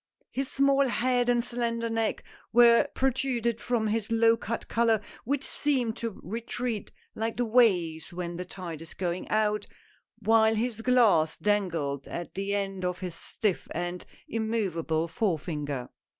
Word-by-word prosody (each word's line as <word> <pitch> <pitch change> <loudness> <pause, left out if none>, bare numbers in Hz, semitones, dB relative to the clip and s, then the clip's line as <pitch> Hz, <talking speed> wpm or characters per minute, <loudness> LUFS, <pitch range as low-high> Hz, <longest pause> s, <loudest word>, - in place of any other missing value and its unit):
His 270 0 -2
small 275 0 +3
head 245 0 +1
and 240 -1 +3
slender 235 -1 -2
neck 225 -1 -1 0.3
were 235 +3 +6
protruded 245 -3 0
from 240 -3 0
his 215 0 -1
low 230 0 +5
cut 230 0 -4
collar, 230 -1 +3 0.3
which 280 +3 0
seemed 255 -6 0
to 230 -3 -4
retreat 230 +2 -3 0.2
like 225 +1 -3
the 245 - +1
waves 185 -9 +3
when 175 -1 -4
the 180 - -3
tide 175 -4 -7
is 165 - -10
going 180 -1 -3
out 210 -1 +1 0.3
— - - -42
while 220 0 +4
his 225 0 -1
glass 220 -11 +4
dangled 165 -10 0
at 175 - -6
the 195 +1 -1
end 195 -2 -2
of 180 0 -2
his 180 -2 -4
stiff 195 +3 -2
and 175 +1 -3 0.2
immovable 190 -8 -1
forefinger. 150 - -2
220 Hz, 150 wpm, -28 LUFS, 180-235 Hz, 0.3 s, were